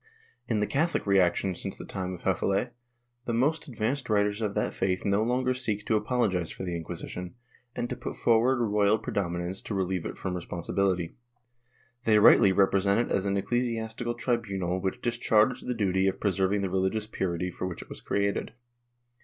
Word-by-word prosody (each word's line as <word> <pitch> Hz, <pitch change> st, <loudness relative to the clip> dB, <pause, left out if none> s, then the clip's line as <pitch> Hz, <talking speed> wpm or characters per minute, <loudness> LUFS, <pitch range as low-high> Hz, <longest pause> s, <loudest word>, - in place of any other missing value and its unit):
^ -, -, -42 dB, 0.4 s
In 110 Hz, -3 st, 0 dB
the -, -, +3 dB
Catholic 160 Hz, +9 st, 0 dB
reaction 95 Hz, -1 st, +3 dB
since -, -, -5 dB
the -, -, -8 dB
time 95 Hz, -1 st, -4 dB
of 85 Hz, -, -13 dB
Hefele, 95 Hz, +5 st, +1 dB, 0.5 s
the 120 Hz, -, -2 dB
most 150 Hz, +7 st, +1 dB
advanced 125 Hz, +1 st, -2 dB
writers 105 Hz, 0 st, +1 dB
of 105 Hz, -2 st, -1 dB
that -, -, 0 dB
faith 95 Hz, -1 st, -1 dB
no 100 Hz, +1 st, +2 dB
longer 125 Hz, +3 st, +1 dB
seek 110 Hz, -5 st, -2 dB
to 110 Hz, -, +2 dB
apologize 105 Hz, -6 st, +1 dB
for -, -, -6 dB
the 90 Hz, -2 st, -3 dB
Inquisition, 85 Hz, +3 st, -6 dB, 0.4 s
and 120 Hz, -, -2 dB
to -, -, -4 dB
put -, -, -6 dB
forward 120 Hz, +2 st, +3 dB
royal 105 Hz, +1 st, +3 dB
predominance 90 Hz, -3 st, -3 dB
to 105 Hz, -, -4 dB
relieve 95 Hz, -2 st, -1 dB
it -, -, -7 dB
from 95 Hz, -, -3 dB
respon 90 Hz, -1 st, -5 dB
sibility. 90 Hz, -4 st, 0 dB, 0.9 s
They 110 Hz, -1 st, +5 dB
rightly 100 Hz, -2 st, +7 dB
represent 100 Hz, +1 st, +3 dB
it -, -, +2 dB
as 100 Hz, +1 st, 0 dB
an 100 Hz, 0 st, +1 dB
ecclesiastical 115 Hz, +1 st, -1 dB
tribunal 100 Hz, -7 st, -1 dB
which 95 Hz, 0 st, -3 dB
discharged 120 Hz, 0 st, +2 dB
the 125 Hz, -, -1 dB
duty 95 Hz, -3 st, +1 dB
of 95 Hz, 0 st, -1 dB
preserving 100 Hz, 0 st, +1 dB
the 95 Hz, -, -2 dB
religious 95 Hz, +3 st, 0 dB
purity 90 Hz, -4 st, -2 dB
for 90 Hz, -, -4 dB
which 90 Hz, -, -6 dB
it -, -, -23 dB
was -, -, -8 dB
created. 100 Hz, +1 st, -1 dB
100 Hz, 185 wpm, -28 LUFS, 95-115 Hz, 0.9 s, rightly